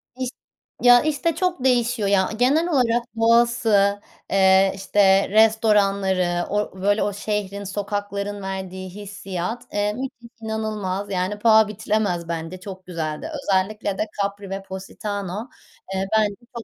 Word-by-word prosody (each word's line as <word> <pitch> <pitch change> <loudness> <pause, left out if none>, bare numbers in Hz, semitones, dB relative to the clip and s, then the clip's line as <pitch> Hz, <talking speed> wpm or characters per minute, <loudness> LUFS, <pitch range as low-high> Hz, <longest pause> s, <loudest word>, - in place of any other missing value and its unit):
İş 255 -1 -3 0.5
ya 245 0 +7
işte 310 +2 0
çok 355 -6 -1
değişiyor, 240 -5 +2
ya. 190 -2 +3
Genel 290 +8 +3
olarak 240 -6 +2 0.2
doğası, 225 -3 +3 0.3
eee, 190 0 +5
işte 195 0 +3
restoranları, 200 -5 +3
or 205 +1 +1 0.2
o - - -9
böyle 205 +2 +2
o 205 - -1
şehrin 205 -1 -3
sokakların 205 0 -4
verdiği 190 -1 -5
hissiyat, 195 +1 -5
eee, 205 0 0
müthiş 240 -1 -7
inanılmaz. 215 -3 -3
Yani 190 +3 -1
paha 220 -1 +5
biçilemez 205 -5 -1
bence 165 +2 -5
çok 185 -1 -9
güzeldi. 165 - -4
Özellikle 195 +1 0
de 215 - 0 0.2
Capri 200 0 -3
ve 195 0 -5
Positano, 200 +3 -5 0.5
eee, 190 0 -1
bence 205 -2 +1 0.2
çok 235 - -5
205 Hz, 135 wpm, -22 LUFS, 190-220 Hz, 0.5 s, ya